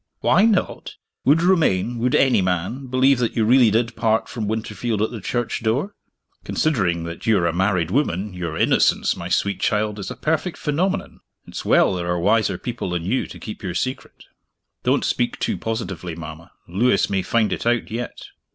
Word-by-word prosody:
"Why - - +4
not! 215 -5 0 0.3
Would 155 +5 +4
Romayne 120 - +2
would 125 +2 +1
any 125 -6 +4
man 95 +9 -2
believe 130 +1 +3
that 120 -2 -1
you 110 - +2
really 120 0 +6
did 115 +2 0
part 110 -1 +1
from 110 -4 -4
Winterfield 110 +1 -2
at 110 - 0
the 115 -4 -7
church 120 +4 -2
door? 130 - -1 0.5
Considering 95 - 0
that 85 +4 -7
you 110 -2 +4
are 85 - +1
a 85 - +1
married 90 -2 +1
woman, 105 - 0
your 85 -3 -4
innocence, - - +2
my - - -6
sweet 100 -1 0
child, 105 0 0
is 100 - -5
a - - -6
perfect 160 +3 -1
phenomenon! 185 +6 -2 0.3
It's - - -7
well - - +4
there 90 -1 -3
were 90 0 0
wiser 105 0 +2
people 120 -3 -4
than 85 -1 -3
you 125 +8 0
to - - -10
keep 105 - -8
your 90 -3 -4
secret." 130 +8 -4 0.6
"Don't - - +1
speak - - 0
too - - -1
positively, 95 -7 -4
mama. 80 0 -9 0.2
Lewis 100 +4 +2
may 95 -1 0
find 110 +3 +1
it - - -4
out 120 -2 +1
yet." 120 +2 -5
110 Hz, 190 wpm, -22 LUFS, 90-125 Hz, 0.6 s, really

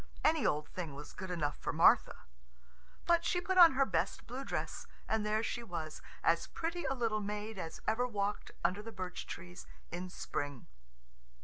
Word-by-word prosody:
Any 315 0 +4
old 150 0 0
thing 165 -6 -5
was 145 - -8
good 190 0 -6
enough 155 -5 -1
for - - -2
Martha. - - +5 0.8
But 340 0 +4
she 355 - +1
put 370 +1 +1
on 335 -5 +10
her 275 +1 +4
best 180 -4 -1
blue 255 +3 -5
dress, - - -3 0.2
and 220 -1 +1
there 215 +1 +1
she 240 - -2
was, 165 -8 -5 0.2
as 170 0 +3
pretty 340 +1 -3
a 270 - +1
little 225 -4 0
maid 210 0 -4
as 165 -2 -6
ever 240 +3 +2
walked 205 -3 -2
under 180 +4 +1
the 225 +2 -8
birch 185 -3 -5
trees 175 -1 -8 0.2
in 180 +1 -4
spring. 145 -6 -4
210 Hz, 180 wpm, -34 LUFS, 175-245 Hz, 0.8 s, on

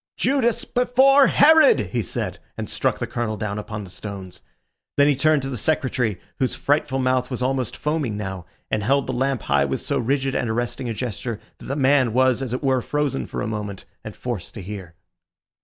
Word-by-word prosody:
"Judas 255 -4 +1
before 265 +3 +5
Herod!" 320 +9 +6
he - - 0
said, - - -3 0.2
and - - -4
struck - - 0
the - - -2
Colonel 115 -3 -3
down 105 0 -3
upon 105 0 -6
the 95 - -8
stones. 95 -2 -7 0.6
Then 145 0 +5
he 145 - +4
turned 155 0 +3
to 135 - -3
the 125 - -3
Secretary, 130 - 0 0.2
whose 130 -2 +1
frightful 145 -2 0
mouth 130 -1 +1
was 125 -1 -2
almost 130 -2 -1
foaming 150 -8 -1
now, 95 -4 -5 0.2
and 110 - +1
held 135 +6 +2
the 130 - -3
lamp 130 -1 0
high 70 0 +2
with 70 - -2
so - - -1
rigid 135 +2 0
and 120 - -1
arresting 120 +2 -2
a - - -1
gesture, 120 -1 -4 0.2
that - - -11
the 135 - -3
man 135 -4 +3
was, 130 0 +3
as 130 -3 -3
it 125 +4 -3
were, 130 -2 +2
frozen 145 - -1
for - - -4
a - - -2
moment, 105 -3 -5 0.2
and - - -8
forced 120 -8 -5
to 105 - -7
hear. 95 -4 -8
125 Hz, 205 wpm, -23 LUFS, 105-140 Hz, 0.6 s, Herod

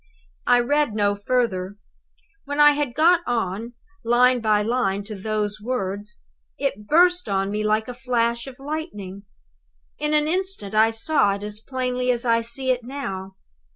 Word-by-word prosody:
"I 245 0 +6
read 290 -2 +1
no 205 -1 +2
further. 205 -3 -1 0.7
When 285 +1 -4
I 295 0 +8
had 290 -4 -2
got 340 +3 +5
on, 230 0 -2 0.3
line 245 +1 +4
by 210 -2 +2
line, 210 -4 0
to 215 +2 -8
those 210 +1 -3
words, 210 -2 -4 0.4
it 210 -7 -3
burst 355 +2 +4
on 195 0 0
me 210 +1 -2
like 215 +1 +1
a 250 - -5
flash 235 -1 -1
of 260 -1 -10
lightning. 270 - -6 0.7
In 300 +1 0
an 300 0 +2
instant 365 - -2
I 220 +1 +5
saw 225 -3 +1
it 200 - -8
as 210 0 -5
plainly 250 +1 -2
as 245 0 +1
I 230 -1 +3
see 255 +3 -1
it 250 -1 -1
now. 195 -8 -6
235 Hz, 160 wpm, -23 LUFS, 205-265 Hz, 0.7 s, I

